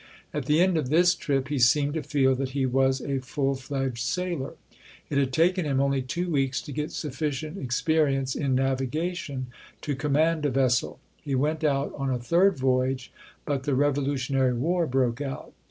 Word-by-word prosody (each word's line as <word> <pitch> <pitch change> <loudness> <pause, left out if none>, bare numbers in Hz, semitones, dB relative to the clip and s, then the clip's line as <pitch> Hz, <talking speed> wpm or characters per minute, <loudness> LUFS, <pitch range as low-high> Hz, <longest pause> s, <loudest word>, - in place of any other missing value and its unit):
At 150 -3 -3
the 150 +1 +3
end 180 -1 +3
of 150 -5 -1
this 175 +4 +5
trip, 140 -5 -1
he 145 -2 -1
seemed 145 +4 +4
to 160 - -2
feel 135 -2 +2
that 130 0 -3
he 135 - +2
was 130 +1 +2
a 140 -1 -2
full 135 +1 -1
fledged 135 -2 -3
sailor. 170 +2 -2 0.6
It 140 - +2
had 135 -1 +1
taken 175 +6 +2
him 140 -3 0
only 140 -1 +1
two 170 +8 -3
weeks 135 -3 +1
to 150 - -8
get 150 +2 -3
sufficient 150 +3 -4
experience 135 0 +1
in 135 -3 0
navigation 135 +2 -1 0.4
to 145 - -2
command 150 +3 +1
a - - +1
vessel. 130 -2 +1 0.2
He 140 -3 -3
went 155 +4 0
out 140 -2 +1
on 135 -1 -2
a 130 - 0
third 175 +11 +3
voyage, 130 0 0 0.3
but 140 -2 -1
the 135 0 0
Revolutionary 135 -2 +1
War 170 +7 0
broke 130 -1 0
out. 135 -2 -6
140 Hz, 180 wpm, -26 LUFS, 130-155 Hz, 0.6 s, this